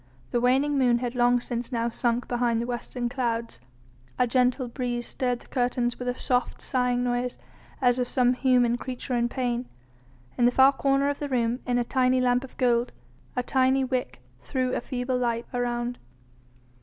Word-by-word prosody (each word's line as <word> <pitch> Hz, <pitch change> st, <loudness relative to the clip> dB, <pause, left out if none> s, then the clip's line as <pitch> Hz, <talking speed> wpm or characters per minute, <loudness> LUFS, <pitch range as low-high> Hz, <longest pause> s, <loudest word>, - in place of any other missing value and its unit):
The 240 Hz, -, +1 dB
waning 275 Hz, +3 st, +2 dB
moon 245 Hz, -2 st, +4 dB
had 245 Hz, 0 st, -3 dB
long 245 Hz, 0 st, +3 dB
since 240 Hz, +1 st, -4 dB
now 235 Hz, -1 st, 0 dB
sunk 235 Hz, +1 st, -1 dB
behind 240 Hz, -2 st, +1 dB
the 235 Hz, -, -2 dB
western 240 Hz, 0 st, -3 dB
clouds, 235 Hz, -, -2 dB, 0.6 s
a 250 Hz, -, +3 dB
gentle 250 Hz, +1 st, +1 dB
breeze 240 Hz, -1 st, -3 dB
stirred 245 Hz, -1 st, -2 dB
the -, -, -18 dB
curtains 245 Hz, -1 st, -1 dB
with 250 Hz, -, -5 dB
a 245 Hz, -, 0 dB
soft, 250 Hz, -1 st, -1 dB
sighing 250 Hz, -1 st, 0 dB
noise 245 Hz, 0 st, -1 dB, 0.4 s
as 245 Hz, -1 st, +3 dB
of 245 Hz, -, -1 dB
some 250 Hz, -1 st, +3 dB
human 245 Hz, -2 st, +2 dB
creature 255 Hz, 0 st, -5 dB
in 240 Hz, -1 st, +1 dB
pain. 245 Hz, -1 st, -2 dB, 0.7 s
In 240 Hz, -, +5 dB
the 245 Hz, -, +5 dB
far 265 Hz, +2 st, +6 dB
corner 275 Hz, 0 st, +1 dB
of 285 Hz, 0 st, -1 dB
the 290 Hz, -, -4 dB
room, 240 Hz, -1 st, 0 dB
in 245 Hz, -1 st, +1 dB
a 245 Hz, -, +2 dB
tiny 255 Hz, +1 st, +2 dB
lamp 250 Hz, 0 st, +2 dB
of 265 Hz, -, -12 dB
gold, 240 Hz, -1 st, +1 dB, 0.4 s
a 250 Hz, -, 0 dB
tiny 265 Hz, +1 st, +2 dB
wick 255 Hz, -, -3 dB, 0.2 s
threw 255 Hz, -, -1 dB
a -, -, -1 dB
feeble 250 Hz, 0 st, -2 dB
light 235 Hz, -1 st, -1 dB
around. 245 Hz, 0 st, -2 dB
245 Hz, 180 wpm, -26 LUFS, 240-255 Hz, 0.7 s, far